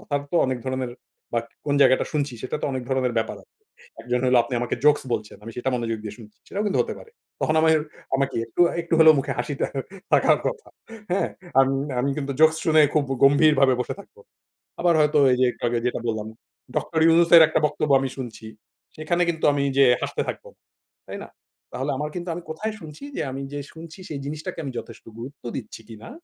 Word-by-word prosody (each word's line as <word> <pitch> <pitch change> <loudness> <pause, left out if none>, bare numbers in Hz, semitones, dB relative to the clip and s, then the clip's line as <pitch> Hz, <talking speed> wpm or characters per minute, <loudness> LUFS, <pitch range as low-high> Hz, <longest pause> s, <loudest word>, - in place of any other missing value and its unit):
কথার 145 -1 -2
তো - - -6
অনেক 130 -1 -2
ধরনের। 130 -1 -2 0.4
বাক 115 -1 0 0.2
কোন 145 - +1
জায়গাটা 130 0 +4
শুনছি? 145 -3 -1
সেটা 130 - -3
তো - - 0
অনেক 130 -1 -3
ধরনের 130 -2 0
ব্যাপার 110 0 -2
আ - - -22 0.6
একজন 125 0 -1
হল 125 - +3
আপনি 120 +2 -5
আমাকে 120 - -1
জোকস 150 0 +5
বলছেন 105 -2 -3
আমি 115 - -8
সেটা 125 +2 -1
মনোযোগ 115 -2 -2
দিয়ে 105 -1 -7
শুনছি। 105 -2 -14
সেটাও 205 +2 -2
কিন্তু 205 - 0
হতে - - -6
পারে। 455 - -14 0.3
তখন 155 - +1
আমাদের 160 -1 +4 0.4
আমাকে 135 0 -1
একটু, 115 - -5 0.2
একটু 170 0 -1
হলেও 160 -1 +8
মুখে 135 0 -1
হাসিটা 140 +3 -2 0.5
থাকার - - +5
কথা 460 -2 -4 0.4
হ্যাঁ, 185 - +1 0.3
আমি, 135 0 +3 0.3
আমি, 135 +3 0
কিন্তু 140 -2 -3
জোকস 160 0 +6
শুনে 155 -1 +5
খুব 155 - +4
গ - - +1
গম্ভীরভাবে 140 -1 +5
বসে 125 - -3
থাকবো। 440 - -18 0.6
আবার 175 -1 +3
হয়তো 150 0 +3
এই 125 - +2
যে 130 - +6
একটু - - -17
আগে 120 0 0
যেটা 125 - -2
বললাম। 110 -1 -2 0.5
ডক্টর 160 - -1
ইউনুসের 170 0 +7
একটা - - +1
বক্তব্য 150 0 -1
আমি 135 0 -2
শুনছি। 120 -4 -7 0.5
সেখানে 170 +3 -1
কিন্তু 160 -2 -1
আমি 140 -1 0
যে 140 - +7 0.2
হাসতে - - -2
থাকবো। - - -6 0.6
তাই - - -6
না? - - -10 0.4
তাহলে 130 +3 -2
আমার 150 +2 -3
কিন্তু 175 0 -5
আমি 175 - -6
কোথায় 215 +8 -3
শুনছি? 150 - -11
যে - - -2
আমি 135 - -5
যে 145 - -3
শুনছি 165 +2 -11
সেই 145 - -4
জিনিসটাকে 155 +5 -5
আমি 135 - -4
যথেষ্ট 115 0 -12
গুরুত্ব 135 +5 -9
দিচ্ছি 110 -2 -8
কি 115 - -9
না? - - -9
140 Hz, 205 wpm, -24 LUFS, 125-160 Hz, 0.6 s, হলেও